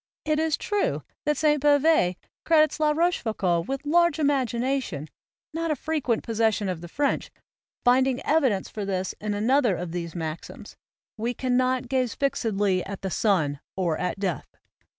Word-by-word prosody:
It 305 0 +1
is 320 -1 +1
true 415 -1 -1 0.2
that 300 0 +1
Sainte 300 -2 +2
Beuve 290 - +4 0.3
credits 310 -1 +3
La 305 -1 +3
Rochefoucauld 220 - 0
with 270 +1 -4
large 340 +1 +3
imagination, 260 - 0 0.5
not 330 +1 -2
a 305 - +1
frequent 275 -5 -1
possession 220 -2 +1
of 175 -3 -4
the 175 - -8
French, 280 - -1 0.6
finding 255 +1 +4
evidence 265 -11 +2
for 210 - -6
this 190 -1 -2
in 210 -1 -2
another 235 0 +2
of 175 -1 -5
these 170 -1 -5
maxims, 160 -1 -6 0.4
"we 235 +3 -2
cannot 255 0 +1
gaze 255 -2 0
fixedly 205 -9 0
at 195 0 -7
the 190 - -2
sun, 160 -11 +1 0.2
or 175 -4 0
at 180 - -2
death." 185 -7 -2
245 Hz, 150 wpm, -25 LUFS, 190-290 Hz, 0.6 s, Beuve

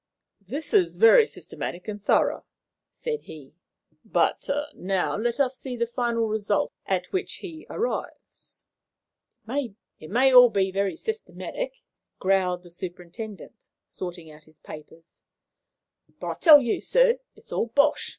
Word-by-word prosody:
"This 290 +8 -6
is 385 -5 +3
very 455 0 +7
systematic 180 - -7
and 205 -1 -6
thorough," - - +2 0.5
said 460 -2 -4
he. 145 -4 -12 0.5
"But - - 0 0.2
now 190 0 -1
let 235 +5 -1
us 265 -1 +1
see 255 -2 -6
the 235 -1 0
final 235 -1 -1
result 210 -1 -1
at 185 -2 -1
which 380 +1 -2
he 325 -4 -10
arrives." 475 +3 -5 0.8
"It 230 - -6
may 255 +5 +4
be - - 0
all 250 -1 +9
very 195 -2 0
systematic," - - -5 0.4
growled 185 -2 +1
the 175 - -15
superintendent, 185 +6 -8 0.2
sorting 175 -3 -8
out 150 0 -16
his 155 -1 -21
papers, 160 +2 -13 1.0
"but - - -6
I - - -1
tell 310 -4 +8
you, 240 -3 -1
sir, - - +3 0.2
it's - - -17
all - - 0
BOSH!" 285 +6 +2
225 Hz, 135 wpm, -25 LUFS, 185-285 Hz, 1.0 s, all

